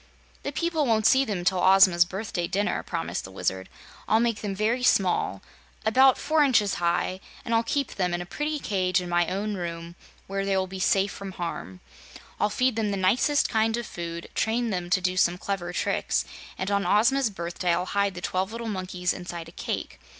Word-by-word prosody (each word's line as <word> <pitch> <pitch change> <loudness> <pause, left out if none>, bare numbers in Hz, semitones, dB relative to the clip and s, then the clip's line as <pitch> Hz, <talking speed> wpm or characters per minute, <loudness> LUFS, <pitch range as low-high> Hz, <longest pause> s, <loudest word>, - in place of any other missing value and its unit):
"The 280 - -4
people 320 -1 0
won't 220 -2 +2
see 265 +3 +6
them 195 -6 -3
till 185 0 +2
Ozma's 185 -2 +6
birthday 185 -2 -3
dinner," 205 +4 0
promised 165 -2 -4
the - - -8
Wizard. 95 0 -3 0.4
"I'll 220 - +4
make 230 -2 0
them 200 -2 -3
very 220 +5 0
small 180 - +2 0.4
about 260 +4 +5
four 310 0 +2
inches 220 -8 +2
high, 175 +2 0 0.3
and 230 - -2
I'll 225 - +4
keep 275 +4 -1
them 180 -2 -1
in 175 - -1
a 175 - -5
pretty 300 +10 -3
cage 185 -8 0
in 180 - -5
my 175 -1 +2
own 205 +3 -2
room, 170 -2 -5 0.3
where 195 0 -3
they 195 -1 +1
will 190 - +1
be 190 0 -8
safe 195 +1 +2
from 195 -1 -7
harm. 165 - -6 0.6
I'll 210 - +2
feed 250 +2 +1
them 215 -2 0
the 200 - -1
nicest 235 +10 +2
kind 225 0 +1
of 240 - -4
food, 170 -2 -6
train 230 +1 0
them 180 -2 -3
to 185 +1 +2
do 185 0 -1
some 175 -1 +3
clever 180 -2 -3
tricks, - - 0 0.3
and 190 +2 -2
on 200 0 +2
Ozma's 240 +5 +3
birthday 175 -2 -2
I'll 175 +2 +1
hide 200 0 0
the 180 - -6
twelve 185 +2 -1
little 230 0 -5
monkeys 185 -3 -2
inside 175 -2 -7
a - - -14
cake. - - -5
195 Hz, 200 wpm, -26 LUFS, 180-225 Hz, 0.6 s, see